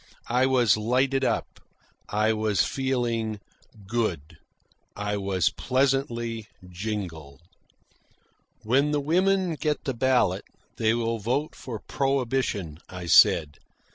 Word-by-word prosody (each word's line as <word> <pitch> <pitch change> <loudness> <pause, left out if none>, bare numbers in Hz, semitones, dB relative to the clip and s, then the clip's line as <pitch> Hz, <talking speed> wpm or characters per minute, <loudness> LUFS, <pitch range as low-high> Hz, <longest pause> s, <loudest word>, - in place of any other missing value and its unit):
I 125 +2 +3
was 120 -6 +4
lighted 130 +5 +1
up, - - -1 0.5
I 110 +1 +2
was 110 -2 +1
feeling 120 -5 -1 0.5
"good," 95 -9 -2 0.6
I 105 0 -2
was 95 -2 0
pleasantly 125 -4 -1 0.2
jingled. 90 -7 -6 1.2
"When 135 +6 +2
the 145 - +2
women 185 +4 +2
get 150 -1 -2
the 135 - -2
ballot, 115 -6 +1 0.3
they 110 0 +2
will 115 -1 -1
vote 125 +8 -1
for 120 -4 -6
prohibition," 130 - -1
I 90 -1 -7
said. 75 -3 +5
115 Hz, 110 wpm, -26 LUFS, 105-135 Hz, 1.2 s, said